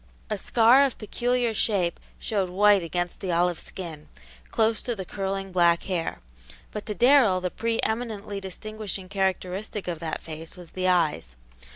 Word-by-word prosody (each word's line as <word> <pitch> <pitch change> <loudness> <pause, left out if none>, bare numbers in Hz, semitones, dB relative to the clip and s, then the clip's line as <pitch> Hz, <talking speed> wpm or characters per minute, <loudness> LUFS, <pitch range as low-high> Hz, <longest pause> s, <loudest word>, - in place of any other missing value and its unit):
A 210 - 0
scar 240 +6 +5
of 275 -3 0
peculiar 240 +2 0
shape 195 -5 +1 0.2
showed 195 -4 -1
white 200 +2 +5
against 175 +1 -3
the 185 - -2
olive 175 0 +2
skin, 165 -5 -8 0.4
close 225 0 +1
to 240 - -3
the 190 -3 -5
curling 195 0 -3
black 170 -2 +4
hair. 175 -4 -2 0.5
But 210 - -6
to 210 - -2
Darrell 245 -4 +5
the 180 -1 -2
pre 230 0 -1
eminently 220 -3 -2
distinguishing 195 0 -5
characteristic 190 +1 -2
of 170 -3 -3
that 160 -1 -4
face 160 +1 -8
was 175 -2 -12
the 185 0 -1
eyes. 150 - +1
195 Hz, 160 wpm, -26 LUFS, 175-215 Hz, 0.5 s, scar